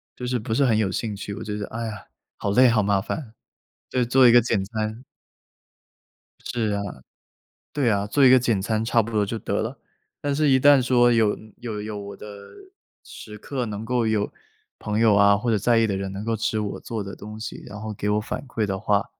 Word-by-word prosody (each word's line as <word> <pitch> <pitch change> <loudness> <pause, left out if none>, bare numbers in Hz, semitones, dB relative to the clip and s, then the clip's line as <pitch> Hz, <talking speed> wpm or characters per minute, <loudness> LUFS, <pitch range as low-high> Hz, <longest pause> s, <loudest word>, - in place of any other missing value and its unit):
就 125 - -6
是 125 0 -1
不 110 +1 -4
是 140 - +3
很 115 -4 +3
有 105 -3 +1
兴 105 +2 -3
趣， 100 0 -6
我 - - -7
觉 105 -1 -4
得- 105 - -5
哎 115 +1 -4
呀， 105 -3 -7 0.3
好 100 - -2
累 125 +5 +6
好 115 -2 +3
麻 100 -1 +2
烦， 115 +2 -5 0.6
就 125 - +1
做 130 +1 +5
一 120 - +7
个 120 - +8
简 110 -4 0
餐 110 +3 -4 1.4
是 110 -3 -2
啊， 100 0 -1 0.9
对 140 -5 +1
啊， 100 -1 0
做 140 +5 +3
一 130 - +8
个 130 - +7
简 115 -5 0
餐 110 +2 -1
差 115 +1 +3
不 115 +1 -6
多 105 -2 +1
就 115 +3 -4
得 - - -2
了。 - - -4 0.4
但 145 -1 -1
是 150 -1 +2
一 130 0 +5
旦 145 -1 +6
说 120 -1 +4
有 110 -3 +2 0.2
有 110 -3 -5
有 105 -1 -5
我 100 0 -8
的 - - -10 0.8
时 105 -1 -11
刻， 130 +2 -4
能 110 0 -5
够 120 -1 0
有 105 -2 0 0.5
朋 105 0 -2
友 110 -3 +5
啊， 100 0 +5
或 120 +2 -2
者 110 - +3
在 115 +4 +2
意 115 -1 +3
的 100 - -1
人 95 0 -4
能 100 +2 -6
够 115 0 0
吃 110 0 -1
我 105 -1 -4
做 110 -3 -5
的 95 - -8
东 105 +1 -9
西， 110 - -7
然 105 +1 -9
后 110 -1 -5
给 105 +1 -3
我 105 - +2
反 110 - -5
馈 110 -4 -1
的 95 -1 -2
话， 105 +1 +1
110 Hz, 245 characters per minute, -24 LUFS, 105-120 Hz, 1.4 s, 个